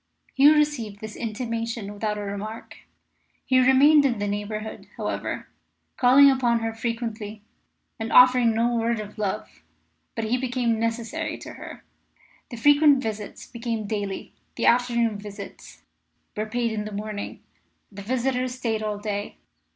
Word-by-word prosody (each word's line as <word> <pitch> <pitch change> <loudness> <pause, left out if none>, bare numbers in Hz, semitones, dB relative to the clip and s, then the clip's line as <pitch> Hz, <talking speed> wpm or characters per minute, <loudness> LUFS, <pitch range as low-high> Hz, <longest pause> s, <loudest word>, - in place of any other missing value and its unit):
Hugh 290 +3 +6
received 250 -9 0
this 215 0 -8
intimation 230 -2 -4
without 210 0 -2
a - - -4
remark. 205 +2 -6 0.7
He 260 -1 +4
remained 275 +4 +6
in 255 -5 +1
the 205 0 -2
neighbourhood, 215 +1 -4
however, - - -3 0.5
calling 260 +3 +7
upon 240 -3 +1
her 225 0 -2
frequently 225 -2 -4 0.6
and 225 0 -4
offering 250 -2 +6
no 235 +2 +2
word 230 -1 0
of 210 +1 -8
love. 190 - -4 0.5
But 225 - -2
he 245 +4 0
became 245 -3 0
necessary 230 +8 -2
to - - -9
her. - - -10 0.7
The 240 - -7
frequent 290 +2 +5
visits 215 -2 -5
became 230 -3 -4
daily; 200 -2 -4 0.2
the - - -1
afternoon 235 -3 +2
visits 200 -1 -10 0.5
were 215 +1 -2
paid 235 +1 -1
in 210 -1 -3
the 215 - -6
morning: 210 0 -6 0.5
the 200 0 -9
visitor 255 +3 0
stayed 245 -3 -2
all 210 -1 -2
day. 205 -1 -4
230 Hz, 145 wpm, -25 LUFS, 210-250 Hz, 0.7 s, calling